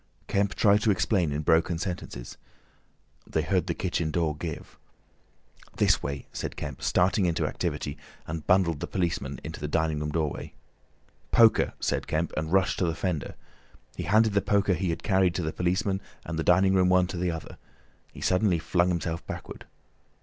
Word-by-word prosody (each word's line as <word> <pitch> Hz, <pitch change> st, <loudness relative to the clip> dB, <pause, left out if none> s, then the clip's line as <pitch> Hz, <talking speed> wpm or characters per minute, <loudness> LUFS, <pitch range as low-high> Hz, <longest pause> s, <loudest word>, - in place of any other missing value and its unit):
Kemp 100 Hz, 0 st, 0 dB
tried 105 Hz, -1 st, +4 dB
to 110 Hz, -, +2 dB
explain 95 Hz, -4 st, +2 dB
in 75 Hz, +2 st, -2 dB
broken 80 Hz, +2 st, +3 dB
sentences. 80 Hz, -9 st, -5 dB, 0.9 s
They 80 Hz, -, 0 dB
heard 90 Hz, +1 st, 0 dB
the 85 Hz, -, -1 dB
kitchen 85 Hz, -3 st, -1 dB
door 80 Hz, -2 st, 0 dB
give. 80 Hz, -1 st, -7 dB, 1.0 s
"This -, -, +3 dB
way," 70 Hz, -2 st, -4 dB
said -, -, -4 dB
Kemp, -, -, -6 dB
starting 90 Hz, +1 st, +2 dB
into 85 Hz, -, 0 dB
activity, 70 Hz, +1 st, -3 dB, 0.3 s
and 80 Hz, -1 st, -6 dB
bundled 90 Hz, -5 st, +3 dB
the -, -, -4 dB
policemen 85 Hz, -7 st, -2 dB
into -, -, -7 dB
the 75 Hz, -, -3 dB
dining 80 Hz, 0 st, 0 dB
room 75 Hz, 0 st, -2 dB
doorway. 75 Hz, -1 st, -3 dB, 0.7 s
"Poker," 115 Hz, -2 st, +5 dB
said -, -, -1 dB
Kemp, 80 Hz, +2 st, -1 dB
and 80 Hz, +1 st, -2 dB
rushed 95 Hz, 0 st, +2 dB
to 90 Hz, -, +2 dB
the 80 Hz, -, -1 dB
fender. 85 Hz, -5 st, -3 dB, 0.6 s
He -, -, -4 dB
handed 110 Hz, +4 st, +4 dB
the 100 Hz, -, +3 dB
poker 100 Hz, -1 st, +2 dB
he 95 Hz, 0 st, -1 dB
had 80 Hz, -, -3 dB
carried 95 Hz, -3 st, +2 dB
to 90 Hz, -, -1 dB
the 80 Hz, -, -2 dB
policeman 95 Hz, +2 st, 0 dB, 0.2 s
and 80 Hz, -, -4 dB
the -, -, 0 dB
dining 95 Hz, +3 st, +4 dB
room 90 Hz, -1 st, +4 dB
one 90 Hz, 0 st, +4 dB
to 90 Hz, 0 st, -6 dB
the 90 Hz, +1 st, 0 dB
other. 80 Hz, -1 st, -6 dB, 0.5 s
He -, -, -11 dB
suddenly 90 Hz, -1 st, +2 dB
flung 85 Hz, +2 st, +1 dB
himself 85 Hz, -1 st, -2 dB
backward. -, -, -7 dB
85 Hz, 180 wpm, -27 LUFS, 80-95 Hz, 1.0 s, Poker